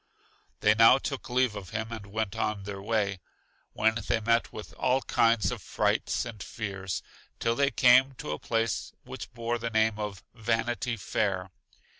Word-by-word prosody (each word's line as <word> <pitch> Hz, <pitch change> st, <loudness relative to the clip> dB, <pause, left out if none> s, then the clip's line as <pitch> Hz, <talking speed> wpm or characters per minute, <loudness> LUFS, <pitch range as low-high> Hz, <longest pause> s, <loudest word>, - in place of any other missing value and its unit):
They 105 Hz, -, +5 dB
now 115 Hz, +4 st, +7 dB
took 135 Hz, -1 st, -5 dB
leave 125 Hz, -3 st, +2 dB
of 100 Hz, -3 st, -7 dB
him 110 Hz, +1 st, -4 dB
and 110 Hz, -3 st, -7 dB
went 110 Hz, 0 st, -3 dB
on 105 Hz, -2 st, -1 dB
their 100 Hz, -1 st, -6 dB
way, 100 Hz, -2 st, 0 dB, 0.5 s
when 110 Hz, +2 st, +2 dB
they -, -, +2 dB
met 115 Hz, +1 st, +1 dB
with 90 Hz, -7 st, -9 dB
all 130 Hz, +9 st, +1 dB
kinds 115 Hz, -4 st, +3 dB
of -, -, -5 dB
frights -, -, 0 dB
and 115 Hz, -4 st, -8 dB
fears, 95 Hz, -4 st, -4 dB, 0.4 s
till 115 Hz, -, +1 dB
they 140 Hz, +3 st, +2 dB
came 130 Hz, +1 st, +5 dB
to 95 Hz, -, -6 dB
a 75 Hz, -, -3 dB
place 115 Hz, -1 st, -1 dB
which -, -, -8 dB
bore 115 Hz, 0 st, -2 dB
the 115 Hz, 0 st, -2 dB
name 110 Hz, -1 st, +2 dB
of 105 Hz, -2 st, -5 dB
Vanity 115 Hz, +2 st, -1 dB
Fair. 95 Hz, -2 st, -1 dB
110 Hz, 170 wpm, -28 LUFS, 100-115 Hz, 0.5 s, now